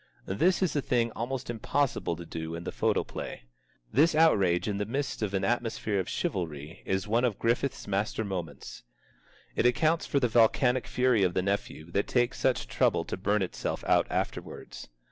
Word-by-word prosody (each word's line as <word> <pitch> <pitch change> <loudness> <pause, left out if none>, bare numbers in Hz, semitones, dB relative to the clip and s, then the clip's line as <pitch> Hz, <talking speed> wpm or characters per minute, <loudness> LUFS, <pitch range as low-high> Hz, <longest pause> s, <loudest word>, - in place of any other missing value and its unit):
This 175 - +2
is 180 - 0
a 145 - +2
thing 120 -3 +1
almost 125 +3 -4
impossible 120 -4 -1
to 85 +1 -9
do 80 0 -5
in 85 - -6
the - - -4
photoplay. - - -2 0.5
This 155 +6 +4
outrage 100 - +4
in 100 -1 -1
the 105 - 0
midst 135 +3 -2
of 100 -2 -1
an 95 - 0
atmosphere 115 -3 0
of 95 - -3
chivalry 80 -3 -3
is 95 +1 0
one 115 +3 +2
of 120 -5 +1
Griffith's 120 +4 -1
master 100 +2 -1
moments. 90 -5 -6 0.7
It - - +3
accounts 160 +7 +2
for 140 - +2
the 125 - +2
volcanic 120 +2 +3
fury 125 -3 +2
of 90 -2 +2
the 95 - +1
nephew 95 -4 -3
that 100 +3 0
takes 120 0 +1
such 125 - +1
trouble - - +1
to - - -3
burn 100 +1 +1
itself 90 - -3
out - - +3
afterwards. - - -4
110 Hz, 180 wpm, -29 LUFS, 95-125 Hz, 0.7 s, This